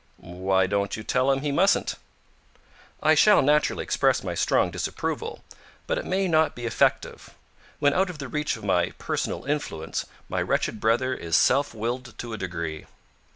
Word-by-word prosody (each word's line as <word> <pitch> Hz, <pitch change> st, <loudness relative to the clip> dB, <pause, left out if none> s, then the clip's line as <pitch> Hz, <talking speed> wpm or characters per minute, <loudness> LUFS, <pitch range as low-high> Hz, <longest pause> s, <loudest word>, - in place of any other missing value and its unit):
"Why 95 Hz, +2 st, 0 dB
don't 100 Hz, +1 st, -1 dB
you 110 Hz, -, -7 dB
tell 130 Hz, +4 st, +1 dB
him 135 Hz, 0 st, 0 dB
he 145 Hz, 0 st, -1 dB
mustn't?" 185 Hz, +8 st, +2 dB, 1.1 s
"I -, -, +5 dB
shall 210 Hz, -7 st, +6 dB
naturally 150 Hz, +2 st, +2 dB
express -, -, +1 dB
my -, -, -3 dB
strong -, -, +2 dB
disapproval, 455 Hz, 0 st, -4 dB, 0.4 s
but -, -, -1 dB
it -, -, -6 dB
may 190 Hz, 0 st, 0 dB
not 160 Hz, -2 st, +2 dB
be 120 Hz, -, -6 dB
effective. 115 Hz, -, 0 dB, 0.4 s
When 145 Hz, 0 st, +3 dB
out 190 Hz, +1 st, +2 dB
of 180 Hz, -, -7 dB
the 140 Hz, -3 st, -6 dB
reach 150 Hz, -1 st, -2 dB
of 110 Hz, -, -13 dB
my 90 Hz, -3 st, +1 dB
personal -, -, -3 dB
influence, 140 Hz, -, -3 dB, 0.2 s
my -, -, -2 dB
wretched 110 Hz, -, -1 dB
brother 120 Hz, +4 st, +1 dB
is 85 Hz, -9 st, 0 dB
self 140 Hz, -2 st, +2 dB
willed 120 Hz, +3 st, -4 dB
to 120 Hz, -2 st, -6 dB
a -, -, -4 dB
degree." 85 Hz, -4 st, -5 dB
125 Hz, 170 wpm, -25 LUFS, 100-150 Hz, 1.1 s, shall